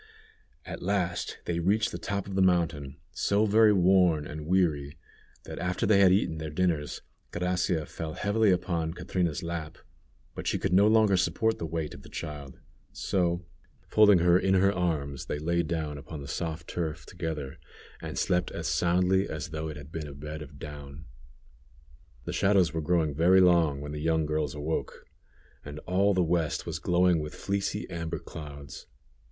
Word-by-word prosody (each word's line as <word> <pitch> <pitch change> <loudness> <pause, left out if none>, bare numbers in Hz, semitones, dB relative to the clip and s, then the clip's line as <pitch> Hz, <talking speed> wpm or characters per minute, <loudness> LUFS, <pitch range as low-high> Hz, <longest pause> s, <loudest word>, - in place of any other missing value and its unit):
At - - -7
last 90 -2 -1
they 85 -1 -1
reached 100 +6 +1
the - - -5
top 100 -1 -3
of 100 - -7
the 95 - +1
mountain, 80 -6 +1
so 100 +2 +1
very 110 +1 +5
worn 90 -5 +4
and 75 +1 -7
weary, 80 -6 +1 0.5
that - - -8
after 90 0 -1
they 100 -1 +5
had 95 -2 +6
eaten 90 -5 +1
their 80 0 -4
dinners, 75 -2 -1 0.3
Gracia 90 -2 0
fell 80 -1 -6
heavily 105 +3 +2
upon 85 -3 0
Catrina's 90 -3 -2
lap, 85 -2 -5 0.6
but - - -6
she - - +1
could 95 - -1
no 100 +3 +6
longer 110 -2 +4
support 95 +5 +1
the 80 - -3
weight 80 -1 -3
of - - -11
the - - -14
child; 75 -4 -7 0.3
so, 90 -2 -1 0.4
folding 105 -3 +6
her 90 +1 +4
in 95 0 +2
her 100 +1 +4
arms, 75 -7 -2
they - - -2
lay 85 +3 0
down 80 -3 -3
upon 80 +1 -8
the - - -8
soft 80 +1 -4
turf 80 -2 -4
together 80 -6 -5 0.4
and - - -6
slept 90 0 +1
as - - -4
soundly 90 +2 +2
as 80 +2 -5
though 80 0 -4
it 75 -1 -6
had 75 0 -11
been 80 -2 -5
a 70 - -9
bed 75 +2 -7
of 75 -1 -10
down. 70 +1 -9 1.2
The - - -4
shadows 95 -4 +3
were 80 - -1
growing 80 -2 +1
very 90 +5 +5
long 85 -6 +4
when 75 0 -6
the 75 0 -5
young 80 0 +1
girls 75 -2 -1
awoke, 75 +2 -4 0.6
and 75 +1 -8
all 95 +2 +2
the 90 - +3
west 85 -2 0
was - - -4
glowing 90 -1 +3
with 75 0 -6
fleecy 100 0 -2
amber 85 -1 -3
clouds. 70 -3 -9
85 Hz, 175 wpm, -28 LUFS, 75-90 Hz, 1.2 s, had